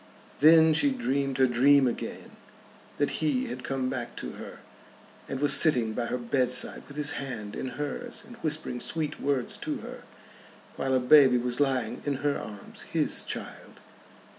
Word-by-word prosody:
Then 160 +1 +7
she 285 - +3
dreamed 140 - -1
her 130 - +5
dream 130 +3 +4
again, 120 - -4 0.7
that 145 - +1
he 145 -5 +1
had 125 +1 -6
come 135 -1 -2
back 120 -2 -4
to - - -6
her, - - -10 0.7
and 135 - -3
was 145 -1 +4
sitting 125 -9 +3
by 115 +1 -2
her 125 - -2
bedside 125 +1 -1
with 140 - -11
his 150 -1 0
hand 110 -6 -6
in - - -4
hers 150 - -3
and 240 - -12
whispering 150 -5 -3
sweet 155 +2 -3
words 140 -3 -1
to - - -4
her, - - -9 0.7
while 135 0 0
a - - +4
baby 130 0 +6
was 125 +1 -2
lying 130 -5 0
in 145 -1 -1
her 145 - +1
arms 105 -2 -9
his - - 0
child. - - -7
135 Hz, 165 wpm, -28 LUFS, 125-145 Hz, 0.7 s, Then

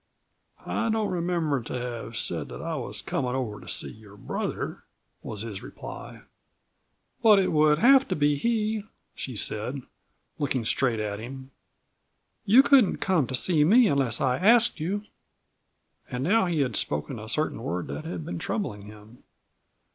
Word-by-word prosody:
"I 230 - -1
don't 220 -1 0
remember 170 -6 0
to 120 - -5
have 120 -2 -5
said - - -2
that - - -9
I - - -4
was - - -5
comin' 125 0 -2
over 120 -6 -3
to - - -14
see - - -2
your 105 -2 -15
brother," - - -4 0.4
was 105 - -4
his 110 -4 -6
reply. - - -9 1.0
"But 220 -3 +7
it 195 - +2
would 150 -1 +4
have 265 - +6
to 185 - -1
be 145 -1 +2
he," 220 +4 0 0.3
she 130 - -6
said, 120 +6 -2 0.6
looking 130 -5 -1
straight 120 -1 +1
at 105 -1 -3
him. 130 +3 -9 0.9
"You 240 +7 +7
couldn't 270 -8 +5
come 180 -9 +1
to 130 - -2
see 155 +3 +3
me 225 +9 +6
unless 135 - +2
I 130 -1 +1
asked 230 +2 +4
you." 195 +7 -2 1.1
And 125 +1 -3
now 200 +5 +3
he 165 -4 0
had 125 -6 -1
spoken 75 - -1
a 110 0 -9
certain 150 -1 -1
word 90 -5 -3
that 70 +2 -5
had 85 -4 -6
been 85 - -5
troubling 105 - -4
him. 105 +3 -14
135 Hz, 160 wpm, -26 LUFS, 110-185 Hz, 1.1 s, But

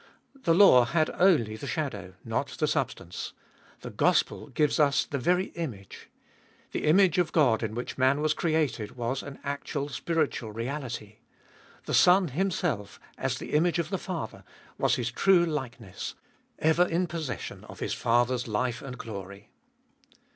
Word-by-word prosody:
The 165 - +4
law 165 -11 +7
had 155 +4 +1
only 150 - +4
the 125 +6 -7
shadow, 105 - -4
not 115 +5 -1
the 155 - +1
substance. 125 - -3 0.5
The - - -7
gospel - - +1
gives 150 0 +1
us 140 -2 +3
the 140 - -3
very 180 +7 +1
image. 120 - -7 0.6
The - - -3
image 180 +2 +5
of 175 - +1
God 130 -9 +3
in 110 -1 -3
which 120 +2 -5
man 130 +2 +3
was 155 0 +2
created 150 -10 -1
was 120 +3 -2
an 140 -1 -9
actual 140 0 -3
spiritual 145 -5 -1
reality. 115 -2 -5 0.7
The - - -4
Son 180 -1 +5
Himself, 155 - -2 0.2
as 130 -1 -2
the - - -7
image 165 +2 +3
of 170 +1 -2
the 190 - -1
Father, 175 -3 -5 0.4
was - - +3
His 120 -1 -2
true 180 +6 +4
likeness 125 - -5 0.2
— - - -41
ever 175 +2 +3
in 175 +2 0
possession 155 - -5
of - - -12
His - - -2
Father's 120 +1 +1
life 120 +2 -1
and 130 -2 -7
glory. 100 -2 -8
140 Hz, 155 wpm, -28 LUFS, 115-165 Hz, 0.7 s, law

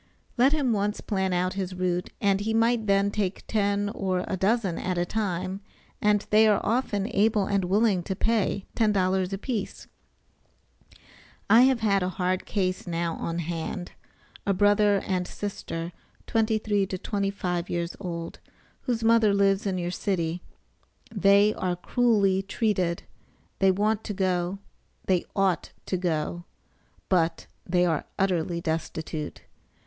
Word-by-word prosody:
Let 260 +3 +4
him 285 -6 +1
once 205 0 -1
plan 190 -3 -1
out 180 +1 0
his 190 -1 -4
route, 180 -1 -1
and 195 -1 +2
he 220 +2 -1
might 230 -1 +2
then 200 0 +3
take 200 -2 -2
ten 205 -1 0
or 185 -3 -2
a - - -1
dozen 195 -1 +1
at 185 -1 -2
a 175 - +1
time, 185 -1 -2 0.4
and 210 -1 +2
they 215 +1 +6
are 210 -2 +4
often 215 -4 0
able 210 0 +3
and 200 -2 0
willing 200 0 +2
to 190 - -2
pay 210 -2 0
$10 190 -4 +1
a 195 - -2
piece. 215 -1 -4 1.7
I 230 - +8
have 245 -4 0
a 195 -3 +2
hard 185 0 -1
case 185 -3 -1
now 170 -1 -1
on 165 0 -3
hand; 170 +1 -4 0.5
a 200 - +1
brother 205 0 +3
and 180 -2 -1
sister 170 -4 -5 0.3
23 215 -3 +1
to 185 - -4
25 190 -3 -2
years 170 0 -2
old, 170 -4 -5 0.4
whose 235 -3 -2
mother 225 -3 +4
lives 200 0 +2
in 190 -1 -1
your 175 0 -2
city. 175 -3 -2 0.7
They 200 +1 +5
are 180 -1 -2
cruelly 200 -1 +2
treated; 195 -4 -1 0.6
they 195 - +5
want 210 +3 +1
to 205 - -4
go, 185 0 0 0.5
they 185 -2 +1
ought 195 -3 0
to - - -1
go; 175 -1 -2 0.6
but 170 -3 +1 0.2
they 180 0 +3
are 160 -4 0
utterly 175 -3 0
destitute. 160 -1 -4
195 Hz, 145 wpm, -26 LUFS, 180-210 Hz, 1.7 s, I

